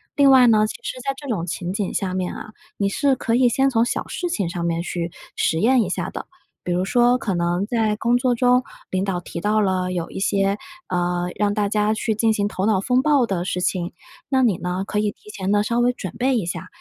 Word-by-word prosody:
另 280 -2 +6
外 255 -2 +7
呢， 215 -2 +5
其 215 - -4
实 255 - -5
在 275 +2 -1
这 285 - -9
种 200 -9 -2
情 180 +1 -4
景 200 -2 -2
下 185 -2 -2
面 185 -1 -2
啊， 215 - -8 0.3
你 200 - +1
是 275 +7 +2
可 230 - 0
以 250 0 +4
先 270 +3 +2
从 230 -3 +2
小 240 - -2
事 355 - -3
情 205 - -1
上 170 0 -4
面 170 0 0
去 170 -1 -4 0.2
实 160 - +1
验 245 +5 +4
一 195 - -1
下 - - -2
的， - - -7 0.4
比 180 - -3
如 180 +1 +1
说， 245 +4 +3
可 210 -6 -2
能 175 +2 0
在 220 -2 0
工 235 +3 +2
作 245 0 +1
中 250 +1 +3 0.3
领 185 0 0
导 190 -3 -1
提 170 - -7
到 210 +3 +2
了 185 -2 0
有 170 -2 -3
一 - - -5
些， 195 0 +1 0.3
呃， 175 0 0
让 205 -1 +1
大 205 -1 0
家 210 0 +1
去 220 +1 -1
进 220 +1 +2
行 205 -1 0
头 190 -1 -2
脑 205 -4 +2
风 250 +5 +2
暴 285 -3 +3
的 185 -5 -2
事 180 -1 -2
情， 180 -1 -1 0.4
那 265 -1 +3
你 215 -8 +3
呢， 180 +1 -3
可 210 - -1
以 210 0 0
提 210 - -18
前 190 -2 -4
呢 205 0 +3
稍 235 +2 0
微 245 +1 +3
准 190 -6 -7
备 260 0 +2
一 205 - -1
下。 170 +1 -5
210 Hz, 270 characters per minute, -22 LUFS, 185-240 Hz, 0.4 s, 外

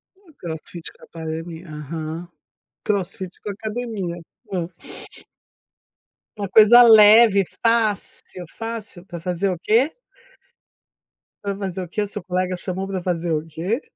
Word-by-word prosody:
O 380 -4 -22
crossfit 165 0 -7
com - - -26
a - - -11
academia, 165 +1 -7
aham, 155 +3 -6 0.6
crossfit 190 -2 -2
com 205 - -4
academia, 215 -4 -4 0.4
é. 175 -1 -3 1.6
Uma 200 -2 -4
coisa 220 +4 +8
leve 215 -2 +8 0.2
fácil, 215 -5 0
fácil 225 -5 -6
para 175 -2 -8
fazer 180 +3 -1
o 180 - -2
quê? 235 +10 +3 1.5
Para 200 -1 -2
fazer 190 -2 -4
o - - -8
que, 210 +5 -2
o 205 - -1
seu 185 - -7
colega 185 0 -1
chamou 190 +1 -4
para 190 -2 -3
fazer 175 -2 -2
o 155 0 -1
quê? 175 - -3
185 Hz, 135 wpm, -22 LUFS, 170-215 Hz, 1.6 s, coisa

